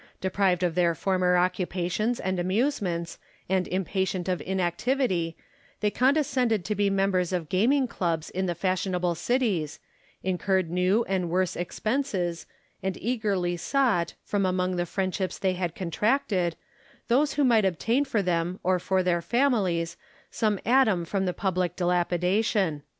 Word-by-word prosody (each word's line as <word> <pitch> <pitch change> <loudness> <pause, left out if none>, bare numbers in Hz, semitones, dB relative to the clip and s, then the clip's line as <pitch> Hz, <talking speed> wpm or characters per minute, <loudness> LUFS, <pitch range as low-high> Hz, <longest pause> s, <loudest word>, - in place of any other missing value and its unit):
Deprived 185 -1 +1
of 175 -2 +1
their 170 -1 +2
former 185 0 +2
occupations 185 +5 0
and 185 -1 -2
amusements, 185 - -1 0.3
and 185 0 +1
impatient 190 -1 -1
of 185 -1 -1
inactivity, 185 - -1 0.4
they 210 -1 +1
condescended 255 - +2
to 210 - -1
be 205 0 +1
members 195 -2 +1
of 175 -4 -2
gaming 250 +9 +3
clubs 170 -8 -2
in 190 +1 -1
the 175 - -1
fashionable 180 0 0
cities, 190 - -1 0.4
incurred 185 -1 0
new 185 +6 +2
and 185 -4 -1
worse 180 +1 0
expenses, 180 -2 -2 0.3
and 190 -1 -2
eagerly 205 -7 -1
sought, 200 - +1
from 205 -1 -1
among 185 0 0
the 175 0 -1
friendships 190 0 -2
they 190 -1 0
had 175 -2 -3
contracted, 185 - 0 0.5
those 275 +5 +2
who 290 - +1
might 235 -5 +4
obtain 225 - +1
for 230 -7 -1
them 175 +1 -1
or 185 0 +2
for 190 +1 +1
their 175 -1 +1
families 185 -7 +1 0.3
some 210 -3 0
atom 225 -8 +3
from 190 +2 -1
the - - +1
public 180 -2 -1
dilapidation. 180 0 +1
185 Hz, 140 wpm, -27 LUFS, 175-215 Hz, 0.5 s, might